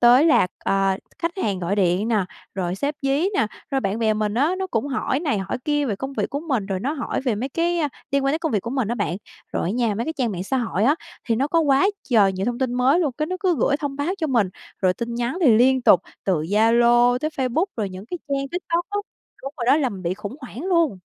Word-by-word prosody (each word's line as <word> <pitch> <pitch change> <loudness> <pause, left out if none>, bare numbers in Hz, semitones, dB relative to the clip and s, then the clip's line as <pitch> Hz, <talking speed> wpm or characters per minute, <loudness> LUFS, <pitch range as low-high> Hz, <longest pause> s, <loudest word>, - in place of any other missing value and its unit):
tới 245 +5 +7
là, 305 - +5 0.2
ờ, 195 -1 +2 0.2
khách 335 0 -1
hàng 195 -3 0
gọi 185 +3 -1
điện 190 +3 +2
nè, 215 -5 +2 0.3
rồi 180 -1 -2
sếp 285 +9 -2
dí 280 +7 +2
nè, 225 - +2 0.2
rồi 270 -1 +1
bạn 200 +1 -1
bè 220 -2 +2
mình 215 0 -1
á, 290 +8 +2
nó 380 - -2
cũng 230 -6 -1
hỏi 265 +1 -1
này 285 - 0
hỏi 195 +6 -3
kia 295 -1 +1
về 205 -6 -1
công 270 +4 -5
việc - - -2
của 285 - -2
mình, 260 -11 -1
rồi 190 -2 -2
nó 275 +6 -1
hỏi 290 - -3
về 250 -5 0
mấy 250 +6 -3
cái, 340 +4 0
ơ, 300 -3 +1 0.2
liên 275 0 +1
quan 275 - +2
tới 315 - 0
công 320 -5 -2
việc 205 - +2
của 230 - -6
mình 260 -5 -1
á 235 - 0
bạn. 195 -6 -1 0.4
Rồi - - -1
á - - 0
nha, 230 -2 0
mấy 230 - -2
cái 320 - -2
trang 245 -7 -1
mạng 180 0 -4
xã 265 - -1
hội 220 -4 0
á, 285 +4 +5 0.3
thì 230 - +1
nó 275 +5 0
có 330 +1 +3
quá 280 +3 +4 0.2
trời 205 -5 +5
nhiều 190 +1 -3
thông 240 0 -1
tin 255 -2 -1
mới 265 +7 +3
luôn, 295 -7 0
cái 305 - 0
nó 370 +3 -3
cứ 365 -5 +2
gửi 280 - +2
thông 285 -2 -4
báo 295 +7 -1
cho 320 - 0
mình. 235 -9 +2 0.3
Rồi 185 -1 +4
tin 235 0 -4
nhắn 240 +8 -2
thì 250 -10 +6
liên 260 +2 +4
tục 185 - +6 0.2
từ 190 - +2
Zalo 235 +6 +4
tới 305 +4 -2
Facebook, 275 +5 0
rồi 210 -4 -1
những 185 +1 -9
cái 355 - -5
trang 275 -1 -1
TikTok 345 +1 -2
á, 410 - -1 0.4
đúng 275 +2 -5
rồi 240 - -3
đó, 275 - +6
làm 270 -6 0
mình 185 - -8
bị 175 +1 -1
khủng 210 +5 -7
hoảng 255 +2 -8
luôn. 335 - +2
250 Hz, 275 wpm, -23 LUFS, 210-290 Hz, 0.4 s, tới